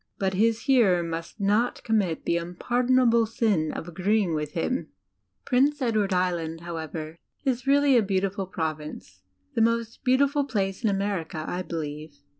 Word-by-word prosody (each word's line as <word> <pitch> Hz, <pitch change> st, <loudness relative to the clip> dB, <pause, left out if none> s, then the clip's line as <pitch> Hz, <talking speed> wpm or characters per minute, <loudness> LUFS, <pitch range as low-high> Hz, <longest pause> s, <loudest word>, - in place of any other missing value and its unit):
But 190 Hz, -1 st, 0 dB
his 225 Hz, +3 st, +2 dB
hearer 220 Hz, -11 st, +4 dB
must 165 Hz, +4 st, -6 dB
not 210 Hz, +5 st, +1 dB
commit 200 Hz, -8 st, 0 dB
the 170 Hz, -, +2 dB
unpardonable 235 Hz, +6 st, +2 dB
sin 210 Hz, -8 st, +1 dB
of 165 Hz, -, -6 dB
agreeing 190 Hz, +1 st, +1 dB
with 150 Hz, -1 st, -3 dB
him! 170 Hz, +9 st, -1 dB
[.ol,,. 260 Hz, -, -1 dB
,,_,dbyCTOOgle -, -, -42 dB
Prince 280 Hz, +4 st, +2 dB
Edward 215 Hz, -4 st, +1 dB
Island, 170 Hz, -3 st, -1 dB
however, 160 Hz, -1 st, -6 dB, 0.3 s
is 260 Hz, 0 st, -1 dB
really 280 Hz, -1 st, +5 dB
a 235 Hz, -, +6 dB
beautiful 195 Hz, -1 st, -1 dB
Province 155 Hz, -, -5 dB, 0.3 s
the -, -, +1 dB
most 230 Hz, +1 st, 0 dB
beaudful 280 Hz, +2 st, +3 dB
place 195 Hz, -2 st, -1 dB
in 220 Hz, -, +3 dB
America, 190 Hz, -5 st, -2 dB
I 180 Hz, -, -2 dB
believe. 155 Hz, -3 st, -6 dB
195 Hz, 155 wpm, -26 LUFS, 165-230 Hz, 0.3 s, a